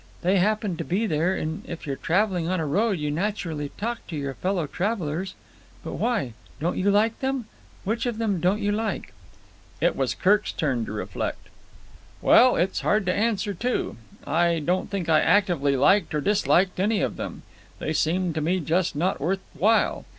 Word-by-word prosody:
They 185 +3 +3
happen 210 -2 0
to 165 - -3
be 190 +7 0
there, 170 0 +1
and 160 -1 -4
if 170 - -6
you're 140 -2 -2
travelling 180 +1 0
on 185 -1 0
a 160 - -1
road 205 +9 +1
you 150 -1 -2
naturally 165 -4 -2
talk 230 +2 -2
to 165 - -6
your 140 -2 -3
fellow 180 +3 -1
travellers. 185 0 -2 0.5
But - - -5
why? 215 - 0 0.3
Don't 165 +5 -1
you 195 +2 +2
like 215 +3 +2
them? 265 -2 -1 0.4
Which 230 +5 -1
of 235 -3 -2
them 215 -5 0
didn't 185 +5 +1
you 205 0 +1
like?" 220 +1 -3 0.7
It - - +2
was - - -1
Kirk's 205 +3 +2
turn 130 -8 -1
to - - -7
reflect. 105 - -4 0.7
"Well, 250 +1 +6
that's 185 +3 0
hard 210 -1 +1
to 180 - +1
answer, 210 -1 0
too. 240 - -2 0.3
I 170 +1 +2
don't 175 +4 -1
think 195 -4 -3
I 155 -1 +5
actively 165 -7 +2
liked 165 +5 +3
or 150 - 0
disliked 190 -1 +2
any 205 +2 +2
of - - -1
them. - - -6 0.3
They 155 - -3
seemed 170 +3 +1
to 155 - -2
me 175 +5 +1
just 170 +2 0
not 180 +6 0
worth 190 +6 0
while. 220 +4 +2
185 Hz, 185 wpm, -25 LUFS, 160-210 Hz, 0.7 s, Well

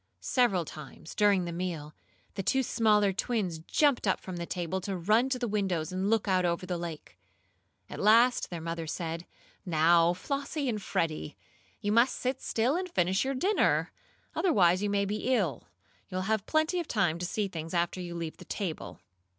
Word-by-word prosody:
Several 200 -10 +2
times, 155 +2 -10
during 200 -4 +3
the 170 - -4
meal, 170 -4 -4 0.4
the 200 - -3
two 265 +7 +1
smaller 210 -4 +3
twins 190 -5 -1
jumped 260 - +2
up 190 - +2
from 185 -2 -7
the 170 0 -4
table 180 +1 -3
to 190 0 -3
run 215 +9 +3
to 260 - 0
the 245 -1 -2
windows 190 -6 -1
and 190 +2 -1
look 225 -1 +2
out 185 -1 +3
over 175 +1 0
the 180 -1 -3
lake. 165 -3 -7 0.7
At - - -8
last 230 +4 +4
their 170 -2 -5
mother 165 0 -4
said: 165 +1 -4 0.4
"Now, 170 0 +4
Flossie 280 - -3
and 215 -4 -1
Freddie, 155 -4 -2 0.4
you 205 -1 0
must 235 +4 +4
sit 260 +1 -2
still 240 +6 +1
and 365 +1 -2
finish 190 - +1
your 270 +1 -1
dinner. 390 +10 +2 0.4
Otherwise 185 - +3
you 205 - 0
may 200 0 +1
be 215 +6 0
ill. 185 - -1 0.4
You'll 185 0 -2
have 215 +1 -1
plenty 315 +3 +1
of 340 - -4
time 175 -7 +1
to 180 - -2
see 210 +2 -1
things 165 -2 -6
after 175 +2 0
you 175 -1 -6
leave 165 -2 -5
the - - -12
table." 185 -7 -5
190 Hz, 185 wpm, -29 LUFS, 170-230 Hz, 0.7 s, last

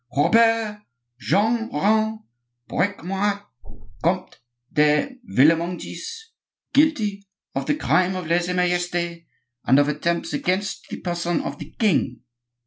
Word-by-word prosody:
"Robert 225 +4 +3 0.4
Jean 225 - +1
Rene 220 +7 +2 0.5
Briquemart, 200 +2 -1 0.6
Comte - - -1 0.3
de 150 - +2
Villemongis, 175 - 0 0.4
guilty 220 -10 +2 0.3
of - - -3
the 295 - +2
crime 185 -10 +2
of 185 -2 -4
lese 175 +2 +1
majeste, 175 -1 -1 0.4
and 130 - +5
of 145 0 +4
attempts 165 +3 -1
against 190 +3 -2
the - - -6
person 175 -1 -1
of 140 +1 -5
the - - -10
king!" 145 - +1
180 Hz, 110 wpm, -23 LUFS, 170-215 Hz, 0.6 s, and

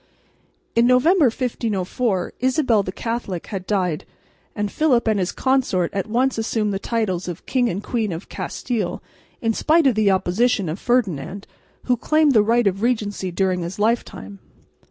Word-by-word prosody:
In 235 +1 +4
November, 295 +7 +4
1504, 225 -4 -1
Isabel 255 -4 +2
the 185 - -5
Catholic 225 -5 -4
had 190 -3 -6
died; 180 -6 0 0.5
and 210 -1 -2
Philip 260 -7 +2
and 215 -2 +2
his 180 -1 -1
consort 260 -10 +1
at 195 +1 -2
once 245 +2 +1
assumed 220 -2 -1
the 195 - -2
titles 200 -6 -2
of 175 -1 -6
King 250 -2 +1
and 190 +3 -4
Queen 225 -5 -1
of 165 +3 -6
Castile, 220 -8 -4 0.4
in 225 0 +2
spite 320 +6 +3
of 265 - +5
the 215 -2 +2
opposition 195 +1 +1
of 165 +5 -4
Ferdinand, 200 - -1 0.4
who 250 - +2
claimed 310 +4 +3
the 220 -5 +5
right 230 +2 +2
of 195 0 0
regency 210 -5 -1
during 185 0 0
his 170 +2 -5
life 225 +3 +2
time. 100 +1 -11
215 Hz, 165 wpm, -21 LUFS, 190-245 Hz, 0.5 s, of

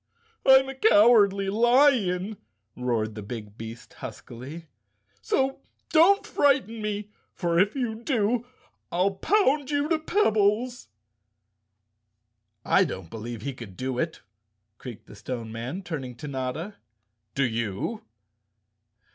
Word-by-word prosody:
"I'm 265 0 +7
a 270 - -5
Cowardly 210 - +5
Lion," 220 -5 +3 0.4
roared 115 -3 -1
the 105 - -7
big 105 -1 -8
beast 115 +1 -9
huskily, 130 +6 -9 0.3
" 105 0 -41
so 265 - 0 0.3
don't 355 +5 +5
frighten 260 -6 +1
me, 210 0 -4 0.2
for 170 -2 +1
if 200 +6 +2
you 245 -5 -1
do 235 -1 0 0.4
I'll 185 +3 +2
pound 290 - +2
you 290 0 0
to 325 -2 +2
pebbles." 240 - +1 1.8
"I - - +4
don't 85 -3 -6
believe 115 0 -6
he 140 - -3
could 115 -7 -11
do 130 -1 -3
it," 160 +2 -2 0.6
creaked 120 -4 -9
the - - -13
Stone 115 -3 -6
Man, 125 - -5
turning 135 -8 -5
to 135 +5 -8
Notta. 140 +9 -4 0.6
"Do 140 - +2
you?" 115 - -2
180 Hz, 120 wpm, -26 LUFS, -, 1.8 s, I'm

